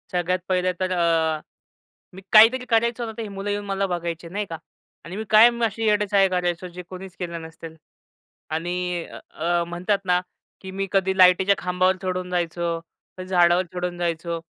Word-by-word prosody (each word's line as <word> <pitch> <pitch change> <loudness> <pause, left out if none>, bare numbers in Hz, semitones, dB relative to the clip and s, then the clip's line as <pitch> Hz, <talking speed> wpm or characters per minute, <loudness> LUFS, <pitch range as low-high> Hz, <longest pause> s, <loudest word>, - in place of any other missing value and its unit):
सगळ्यात 180 +1 0
पहिले 185 0 +1
तर 185 0 -1
अ, 165 -3 +1 0.7
मी 190 - -11
काहीतरी 235 +4 +7
करायचो 235 +1 +1
ना 225 - -5
तर - - -4
ही 220 - -5
मुलं 200 +1 -5
येऊन 205 0 -2
मला 195 0 -1
बघायची, 170 -2 -4
नाही 205 +4 -3
का 165 - -5 0.5
आणि 170 +3 -7
मी 220 - -3
कायम 235 +2 +6
अशी 225 +1 -3
येडेचाळे 205 -2 +3
करायचो 180 -1 -1
जे 180 +1 -9
कोणीच 185 0 -9
केलं 170 -2 -5
नसतील 160 0 -10 0.8
आणि 175 +1 -2
अ, - - -11
अ, 170 +2 0
म्हणतात 180 +4 -1
ना, 180 -1 +3 0.4
की 190 - -8
मी 195 +1 -3
कधी 190 -1 +1
लाईटीच्या 185 +2 +6
खांबावर 185 +1 +1
चढून 185 -1 -3
जायचो, 170 -1 -1 0.4
कधी 185 0 -7
झाडावर 175 0 +3
चढून 180 -1 -3
जायचो 170 -1 -2
180 Hz, 175 wpm, -23 LUFS, 175-195 Hz, 0.8 s, काहीतरी